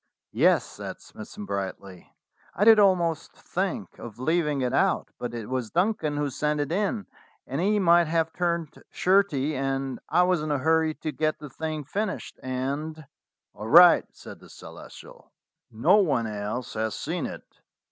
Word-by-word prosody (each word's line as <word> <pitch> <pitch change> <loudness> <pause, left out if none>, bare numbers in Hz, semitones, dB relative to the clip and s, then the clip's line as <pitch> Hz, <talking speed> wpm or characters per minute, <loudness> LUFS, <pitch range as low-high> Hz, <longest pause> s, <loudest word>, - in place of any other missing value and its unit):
"Yes," - - +3
said - - -8
Smithson 105 - -10
brightly, 95 -2 -6 0.4
"I 205 - +2
did 220 -1 +8
almost 175 -5 +2
think - - -4
of 115 -3 -9
leaving 150 +1 0
it 125 -1 -1
out; - - +1
but 120 -1 -5
it 115 -3 -6
was 130 -3 -3
Duncan 170 - 0
who 145 -1 -1
sent 150 +3 -1
it 145 +1 -2
in, 205 +3 -1 0.4
and - - -3
he 210 +3 +2
might 175 -3 +4
have 160 0 0
turned 170 -3 -2
shirty, 175 -7 +1
and 135 0 -2
I 180 - +4
was 180 -3 +1
in 155 - -4
a 145 - +1
hurry 160 +2 +1
to 155 - -5
get 155 0 -1
the 150 -3 -10
thing 155 +1 -4
finished, 200 +8 -4
and 140 +5 -4 0.3
" - - -64
"All 105 - -8
right," 175 +4 +8
said - - -12
the - - -17
Celestial: - - -13 0.4
"no 155 - +3
one 145 - +2
else 105 +3 -4
has 110 0 -2
seen - - -3
it. - - -9
155 Hz, 170 wpm, -26 LUFS, 130-175 Hz, 0.4 s, did